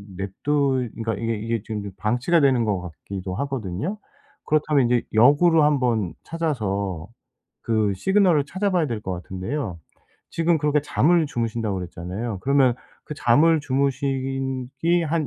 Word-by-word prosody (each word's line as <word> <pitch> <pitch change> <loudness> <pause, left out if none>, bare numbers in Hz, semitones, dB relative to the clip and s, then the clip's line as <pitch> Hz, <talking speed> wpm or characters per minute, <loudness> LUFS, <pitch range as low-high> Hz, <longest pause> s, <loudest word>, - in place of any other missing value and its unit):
냅두 130 +6 0
그니까 115 -2 -3
이게 115 +2 -2
이게 115 +1 -2
지금 110 -2 -4
좀 100 - -6
방치가 125 +11 +1
되는 130 -5 +3
것 100 -4 0
같기도 90 +2 -7
하거든요. 135 - -3 0.5
그렇다면 150 -3 +2
이제 120 0 +2
역으로 150 +8 +5
한번 120 - +1
찾아서 100 - -2 0.6
그 110 -3 +1
시그널을 180 - +3
찾아봐야 185 -3 0
될 115 -5 -3
것 95 - -4
같은데요. 95 - -4 0.5
지금 165 0 +2
그렇게 150 0 +2
"잠을 160 +2 +2
주무신다." 115 -4 -2
그랬잖아요. 95 +4 -5
그러면 135 -3 +3 0.3
그 - - -7
잠을 150 +6 +4
주무시기 135 +3 -1
한 155 -1 0
130 Hz, 320 characters per minute, -23 LUFS, 105-150 Hz, 0.6 s, 역으로